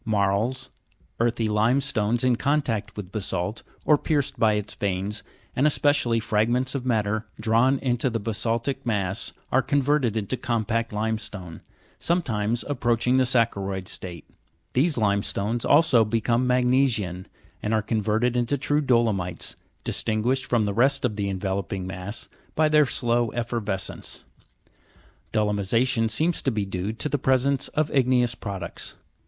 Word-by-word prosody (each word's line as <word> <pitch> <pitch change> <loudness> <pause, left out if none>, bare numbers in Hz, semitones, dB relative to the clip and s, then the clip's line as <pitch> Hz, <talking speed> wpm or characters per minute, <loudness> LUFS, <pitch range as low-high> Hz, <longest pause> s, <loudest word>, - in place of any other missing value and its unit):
Marls, 110 +5 0 0.5
earthy 115 -1 +1
limestones 115 +1 +1
in 125 -1 +4
contact 135 -7 -1
with 95 -3 -6
basa'lt, 100 0 -2 0.2
or 150 -2 +5
pierced 145 -4 -1
by 110 -1 +4
its 105 -1 -2
veins, 100 +1 -2 0.3
and 140 +4 +3
especially 145 -6 +2
fragments 120 +4 +1
of 130 -2 -3
matter 110 -1 0
drawn 120 +4 +3
into 125 -1 0
the 115 -1 -2
basa'ltic 115 +4 -1
mass, 100 -4 -1 0.2
are 130 - +4
converted 135 -3 +1
into 110 +4 -2
compact 115 -1 -1
limestone, 105 -5 -4 0.4
sometimes 120 - 0
approach 120 -5 0
ing 125 +1 +4
the 130 - +4
saccharo'id 100 -6 0
state. 85 -4 -6 0.5
These 145 +3 +2
limestones 105 +1 0
also 145 -6 +5
become 115 +3 +1
magne 125 +2 +4
sian, 95 -6 -3 0.3
and 105 - -2
are 110 -1 +2
converted 110 +3 0
into 125 +4 +1
true 145 +2 +1
dolomites, 110 - 0 0.3
distinguished 115 +4 0
from 120 -3 +2
the 100 -1 -1
rest 135 +5 +3
of 110 -4 -1
the 100 -1 -2
enveloping 95 -1 -3
mass 95 +3 -6 0.3
by 155 0 +3
their 150 -2 +5
slow 120 -1 +1
effervescence. 115 -5 -4 1.1
Dolomi 105 -2 +1
sa'tion 115 +2 +1
seems 160 +10 +1
to - - +1
be 105 -5 -1
due 95 +1 -3
to 115 - -2
the 145 -1 -1
presence 130 +1 +2
of 155 0 -1
igneous 125 -3 +3
products. 95 -6 -6
115 Hz, 140 wpm, -25 LUFS, 105-130 Hz, 1.1 s, or